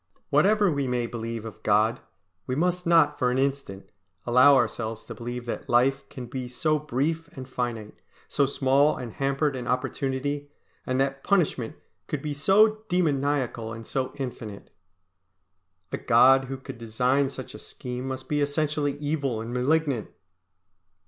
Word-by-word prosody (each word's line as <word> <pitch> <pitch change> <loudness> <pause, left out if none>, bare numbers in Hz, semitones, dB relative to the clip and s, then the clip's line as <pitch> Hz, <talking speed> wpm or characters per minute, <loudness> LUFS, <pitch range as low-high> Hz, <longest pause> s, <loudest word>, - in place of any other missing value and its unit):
Whatever 205 -2 +4
we 140 -2 -1
may 125 -1 0
believe 115 -1 -5
of 110 -1 -9
God, 110 +2 +2 0.5
we 130 - -1
must 180 +3 0
not 165 -3 +4
for 125 - +2
an 125 - 0
instant 135 -8 -2 0.3
allow 125 +4 +6
ourselves 115 -3 -1
to 115 - -8
believe 120 +2 -6
that 120 - -5
life 135 +3 +2
can 125 - -7
be 125 +1 -5
so 155 +5 0
brief 150 +3 -1
and 130 -1 -7
finite, 120 -4 -4 0.3
so 140 -2 +2
small 140 +2 +3
and 120 -4 -6
hampered 140 +1 0
an 125 -2 -5
opportunity, 135 +3 -2 0.4
and 130 0 0
that 135 0 0
punishment 155 - +1 0.3
could 145 -3 -3
be 150 -1 -2
so 210 +8 +4
demoniacal 140 - 0
and 115 +1 -8
so 130 +2 -2
infinite. 120 -7 -7 1.2
A - - -1
God 130 +3 +5
who 135 +1 -5
could 130 -2 -10
design 125 +5 +1
such 130 -2 -8
a - - -9
scheme 125 +1 -6
must 130 0 -5
be 150 -1 0
essentially 145 0 0
evil 145 -5 -1
and 115 +2 -5
malignant. 135 -1 +1
135 Hz, 155 wpm, -26 LUFS, 120-145 Hz, 1.2 s, allow